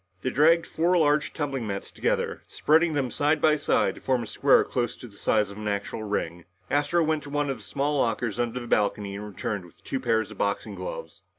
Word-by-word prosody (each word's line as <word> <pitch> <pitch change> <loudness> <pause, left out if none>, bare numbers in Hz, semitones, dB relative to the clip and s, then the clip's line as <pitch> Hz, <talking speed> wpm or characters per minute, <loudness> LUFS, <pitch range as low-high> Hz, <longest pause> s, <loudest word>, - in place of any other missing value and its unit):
They 130 - 0
dragged 165 +5 +4
four 175 +3 +1
large 150 -2 +3
tumbling 135 -6 -3
mats 100 -1 -4
together, - - -1
spreading 160 +2 +3
them 135 -4 -1
side 150 +5 +2
by 155 -1 +4
side 150 - +1
to - - -13
form 130 -3 +1
a - - -5
square 135 +6 +4
close 120 -3 -2
to 125 - -10
the 100 - -16
size 105 0 +1
of 100 - -10
an 105 0 -5
actual 100 +2 -2
ring. 90 -5 -3 0.3
Astro 145 +4 +2
went 155 -1 0
to 145 - -10
one 145 -1 0
of 135 - -4
the 110 - -14
small 140 +7 -1
lockers 115 -1 0
under 120 +1 -1
the 120 - -7
balcony 105 -3 0
and 105 +1 -6
returned 100 0 -4
with 85 - -18
two 135 - -3
pairs 115 -4 0
of - - -12
boxing 100 0 -1
gloves. - - -7
130 Hz, 225 wpm, -26 LUFS, 105-150 Hz, 0.3 s, dragged